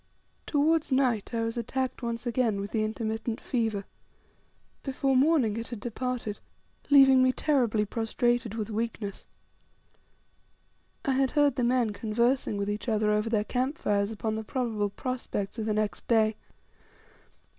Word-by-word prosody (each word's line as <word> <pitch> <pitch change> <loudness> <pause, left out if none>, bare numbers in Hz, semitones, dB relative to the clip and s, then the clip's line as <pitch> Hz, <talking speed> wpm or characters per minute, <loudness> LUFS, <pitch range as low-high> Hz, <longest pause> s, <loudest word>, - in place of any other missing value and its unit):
Towards 310 +1 +2
night 255 -6 +1
I 230 -1 -1
was 230 +1 -2
attacked 260 +3 -2
once 235 0 -3
again 235 -4 +1
with 200 +1 -5
the 220 -2 +1
intermittent 220 +2 -3
fever. 225 -5 -1 1.0
Before 270 0 0
morning 260 -6 +3
it 230 0 -4
had 235 - -6
departed, 240 -1 -4 0.5
leaving 270 -2 +7
me 255 0 +5
terribly 245 -7 +1
prostrated 230 +1 0
with 220 -1 -3
weakness. 215 -2 -4 1.8
I 275 - +2
had 265 0 +2
heard 290 0 +3
the 250 - 0
men 240 -3 +2
conversing 235 +2 0
with 200 0 -2
each 210 +4 -3
other 215 -1 +2
over 210 +1 +1
their 215 -2 +1
camp 260 +7 -1
fires 200 0 0
upon 220 0 -2
the 220 0 -3
probable 220 -4 -1
prospects 235 -2 -4
of 220 - -2
the 215 - +1
next 210 -4 -2
day. 220 -2 +3
230 Hz, 145 wpm, -28 LUFS, 215-255 Hz, 1.8 s, leaving